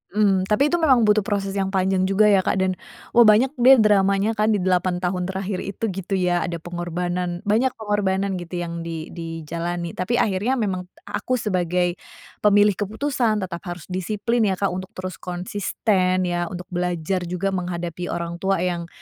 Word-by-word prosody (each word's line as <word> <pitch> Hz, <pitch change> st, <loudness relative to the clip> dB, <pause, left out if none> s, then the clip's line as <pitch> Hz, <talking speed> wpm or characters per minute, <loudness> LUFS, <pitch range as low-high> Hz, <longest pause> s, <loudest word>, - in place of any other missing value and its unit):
Mmm, 195 Hz, -3 st, +3 dB
tapi 275 Hz, +9 st, +2 dB
itu 345 Hz, -, +2 dB
memang 265 Hz, -7 st, +4 dB
butuh 210 Hz, 0 st, +4 dB
proses 195 Hz, -1 st, -2 dB
yang 195 Hz, -1 st, -1 dB
panjang 190 Hz, -1 st, +1 dB
juga, 210 Hz, +2 st, +4 dB
ya, 195 Hz, -, +5 dB
Kak, 185 Hz, -, 0 dB
dan, 185 Hz, -1 st, -1 dB, 0.3 s
wah, 235 Hz, -1 st, +6 dB
banyak, 220 Hz, +5 st, +5 dB
deh, 260 Hz, +3 st, +8 dB
dramanya, 200 Hz, -2 st, +3 dB
kan, 215 Hz, -1 st, +2 dB
di -, -, 0 dB
8 180 Hz, 0 st, +1 dB
tahun 180 Hz, 0 st, -1 dB
terakhir 190 Hz, 0 st, -3 dB
itu, 200 Hz, +3 st, -7 dB
gitu, 195 Hz, +1 st, -3 dB
ya, 180 Hz, -2 st, +1 dB
ada 170 Hz, -, -3 dB
pengorbanan 175 Hz, +1 st, -3 dB
banyak 225 Hz, +5 st, +1 dB
pengorbanan, 200 Hz, -3 st, -1 dB
gitu, 175 Hz, +1 st, -7 dB
yang 170 Hz, 0 st, -5 dB
di 165 Hz, -1 st, -6 dB
dijalani, 170 Hz, +1 st, -4 dB
tapi 185 Hz, +8 st, -2 dB
akhirnya 215 Hz, +3 st, +1 dB
memang 190 Hz, -6 st, -2 dB
t -, -, -55 dB
a -, -, -4 dB
aku 255 Hz, -, -1 dB
sebagai 180 Hz, -4 st, 0 dB, 0.4 s
pemilih 205 Hz, 0 st, +5 dB
keputusan 220 Hz, 0 st, 0 dB
tetap 170 Hz, -2 st, -5 dB
harus 175 Hz, -2 st, -6 dB
disiplin, 215 Hz, +5 st, 0 dB
ya, 190 Hz, -, +1 dB
Kak, 200 Hz, 0 st, 0 dB
untuk 185 Hz, +1 st, -5 dB
terus 185 Hz, 0 st, -6 dB
konsisten, 185 Hz, +1 st, 0 dB
ya, 175 Hz, -1 st, -1 dB
untuk 180 Hz, 0 st, -7 dB
belajar 180 Hz, 0 st, -1 dB
juga 180 Hz, +3 st, -1 dB
menghadapi 175 Hz, -1 st, -4 dB
orang 170 Hz, 0 st, -4 dB
tua 190 Hz, -1 st, 0 dB
yang 175 Hz, -2 st, -2 dB
185 Hz, 180 wpm, -23 LUFS, 175-210 Hz, 0.4 s, deh